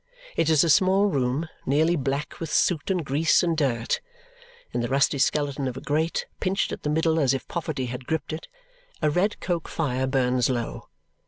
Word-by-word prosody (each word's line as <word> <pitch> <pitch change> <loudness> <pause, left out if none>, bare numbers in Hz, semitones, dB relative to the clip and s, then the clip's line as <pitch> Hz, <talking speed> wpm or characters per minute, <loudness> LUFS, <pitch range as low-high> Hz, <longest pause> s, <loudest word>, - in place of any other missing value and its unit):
It 160 - +2
is 155 -3 +5
a 170 - +1
small 190 +5 +4
room, 140 -3 0 0.2
nearly 155 +5 +2
black 140 0 -3
with 165 - -5
soot, 165 -2 +1
and 180 -5 0
grease, 150 +6 +3
and 170 -2 +1
dirt. 125 -6 0 0.7
In - - -1
the 120 - -1
rusty 140 +2 +2
skeleton 140 -1 +1
of 130 0 -4
a - - -4
grate, 155 +3 -1
pinched 190 +2 0
at - - -5
the 150 - -2
middle 160 +1 +2
as 135 -3 +3
if 135 - -6
poverty 155 -6 -3
had 125 +1 -6
gripped 160 -1 -2
it, 160 - -6 0.6
a 150 - +3
red 190 +7 +1
coke 175 -3 -2
fire 130 -4 -1
burns 130 -2 +2
low. 120 -3 -3
150 Hz, 190 wpm, -25 LUFS, 130-165 Hz, 0.7 s, is